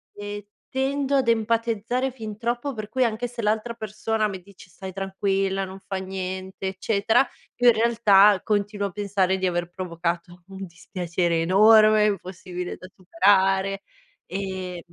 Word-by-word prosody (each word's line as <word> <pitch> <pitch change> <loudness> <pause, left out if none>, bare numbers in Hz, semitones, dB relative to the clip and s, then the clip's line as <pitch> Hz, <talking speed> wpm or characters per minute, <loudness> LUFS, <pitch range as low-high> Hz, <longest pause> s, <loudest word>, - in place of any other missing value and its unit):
e 205 0 -7 0.3
e 265 - -2
tendo 280 +1 0
ad 265 -3 +2
empatizzare 230 +2 0
fin 220 -4 -8
troppo, 240 +4 -2
per 215 -2 -6
cui 255 +3 0
anche 235 +1 -1
se 240 -1 -7
l'altra 220 +2 0
persona 215 0 -2
mi 190 -2 -7
dice: 190 0 -17
“Stai 190 +1 -9
tranquilla, 195 0 -1
non 190 +1 -10
fa 195 0 -5
niente”, 190 0 -5
eccetera, 200 +5 +1 0.3
io 245 0 +2
in - - +6
realtà 210 -3 +5
continuo 205 -1 -1
a - - -9
pensare 195 -1 0
di 190 - -2
aver 175 -1 -2
provocato 175 -1 -4
un 195 0 -8
dispiacere 170 -1 -2
enorme, 215 +4 +6
impossibile 180 -2 -4
da 185 - -11
superare, 195 0 +2 0.5
ehm 185 -2 -5
200 Hz, 150 wpm, -24 LUFS, 190-220 Hz, 0.5 s, in